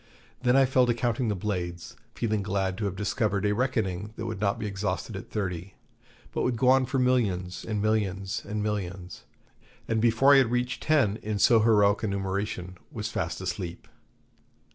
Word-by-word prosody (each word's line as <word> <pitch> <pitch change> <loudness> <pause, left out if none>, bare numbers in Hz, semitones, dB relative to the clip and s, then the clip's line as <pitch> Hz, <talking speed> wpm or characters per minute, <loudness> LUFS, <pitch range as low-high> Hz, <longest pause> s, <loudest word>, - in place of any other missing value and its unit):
Then 125 0 +3
I 135 - +6
fell 130 -1 +3
to 120 - +2
counting 120 0 0
the 105 - 0
blades, 90 -3 -4 0.2
feeling 110 -3 0
glad 95 -1 -1
to 105 - -1
have 100 -2 -2
discovered 105 0 0
a 105 - +2
reckoning 105 -4 -1
that 115 - -5
would 110 -3 -4
not 100 +1 +1
be 110 - -4
exhausted 100 +1 -3
at 95 - -8
thirty, 95 -3 -4 0.6
but - - -2
would 125 -2 0
go 125 +2 +3
on 130 -1 +4
for 135 - -1
millions, 105 -9 +1
and 105 -2 -2
millions, 100 -3 0
and 105 +1 -3
millions; 95 -4 -4 0.6
and 110 -1 0
before 120 +5 +5
I - - +8
had 130 -4 +3
reached 125 +1 -1
ten 135 -10 +2
in 105 -1 -3
so 115 +3 +5
heroic 105 -2 +4
a 110 - -1
numeration 95 -2 -3
was 110 0 -4
fast 85 -1 -3
asleep. 90 -1 -5
105 Hz, 185 wpm, -27 LUFS, 95-115 Hz, 0.6 s, I